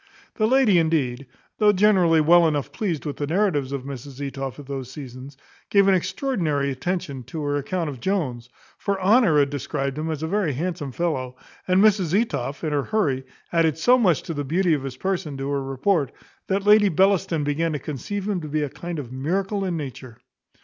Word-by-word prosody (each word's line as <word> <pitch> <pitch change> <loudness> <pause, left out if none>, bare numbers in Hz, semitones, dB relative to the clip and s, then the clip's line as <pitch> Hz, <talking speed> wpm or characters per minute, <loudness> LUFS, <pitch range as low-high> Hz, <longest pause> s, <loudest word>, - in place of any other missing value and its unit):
The 215 - +1
lady 240 -7 +4
indeed, 140 -6 0 0.3
though 210 -1 +6
generally 185 -5 +4
well 170 +2 +6
enough 145 -3 -1
pleased 175 -9 -3
with 145 - -4
the 145 - -2
narratives 160 -6 +1
of 140 -2 -3
Mrs 135 0 -8
Etoff 135 -2 -5
at 145 - -10
those 135 -2 -5
seasons, 130 -1 -9 0.3
gave 200 -1 +4
an 195 - +5
extraordinary 185 - 0
attention 140 -1 -3
to 160 -3 -5
her 145 0 0
account 165 +4 -2
of 140 -4 -6
Jones; 130 -10 -2 0.3
for 200 -2 -1
Honour 195 -4 +4
had 140 -1 +3
described 140 0 -3
him 160 +1 -2
as 155 -1 -3
a - - -1
very 185 -4 0
handsome 160 -1 -3
fellow, 130 -5 -2 0.3
and 185 +2 +4
Mrs 195 -3 +3
Etoff, 145 - -3
in 155 -2 -1
her 145 -2 0
hurry, 145 -12 0 0.3
added 160 -3 +2
so 245 +10 +5
much 190 - +2
to 165 - -5
the 145 -1 -3
beauty 170 +5 +1
of 145 - 0
his 135 -2 -6
person 170 -5 -2
to 135 0 -4
her 140 -1 -1
report, 135 +3 0 0.4
that 195 +1 -1
Lady 210 -1 +6
Bellaston 185 -2 +2
began 155 +3 0
to - - -1
conceive 190 +8 -5
him 195 -4 -1
to 155 - -6
be 150 0 -1
a 145 - -2
kind 175 +4 -6
of 130 -5 -6
miracle 190 +9 -1
in 180 -3 -1
nature. 130 -5 -7
160 Hz, 200 wpm, -23 LUFS, 140-190 Hz, 0.4 s, though